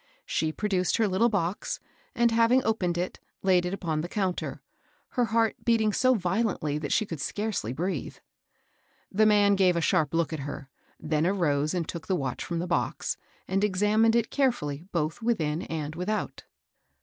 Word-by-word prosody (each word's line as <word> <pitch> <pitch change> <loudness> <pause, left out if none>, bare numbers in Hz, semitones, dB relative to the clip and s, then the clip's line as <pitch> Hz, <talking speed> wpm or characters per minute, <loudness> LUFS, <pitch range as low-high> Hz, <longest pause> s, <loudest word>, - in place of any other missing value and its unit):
She 160 -1 0
produced 185 0 0
her 225 -2 +3
little 200 +5 +3
box, 195 -3 -2 0.4
and, 235 -1 +3
having 230 +3 +4
opened 180 -6 0
it, 180 +1 -3 0.2
laid 180 -2 +3
it 180 - -3
upon 160 -5 -2
the 175 - -5
counter, 190 -3 -2 0.5
her 245 -2 +1
heart 225 0 +2
beating 220 -3 +2
so 255 +3 +4
violently 180 -6 0
that 150 - -4
she 215 - +2
could 165 -8 -6
scarcely 205 - -2
breathe. 165 +3 -3 1.0
The 215 +2 +4
man 205 -1 +5
gave 185 -2 +4
a - - +2
sharp 165 -3 +1
look 165 0 +1
at 160 - -3
her, 140 0 -6 0.3
then 155 +1 0
arose 155 -5 +1
and 170 -3 -1
took 170 -2 -6
the 190 - +1
watch 135 -6 -3
from 170 - -3
the 170 - -1
box, 175 -1 -1 0.3
and 195 +1 0
examined 210 +3 +3
it 235 -1 +1
carefully 170 - 0
both 160 +5 -1
within 165 -9 0
and 155 -3 -4
without. 185 +6 -3
185 Hz, 175 wpm, -27 LUFS, 160-215 Hz, 1.0 s, man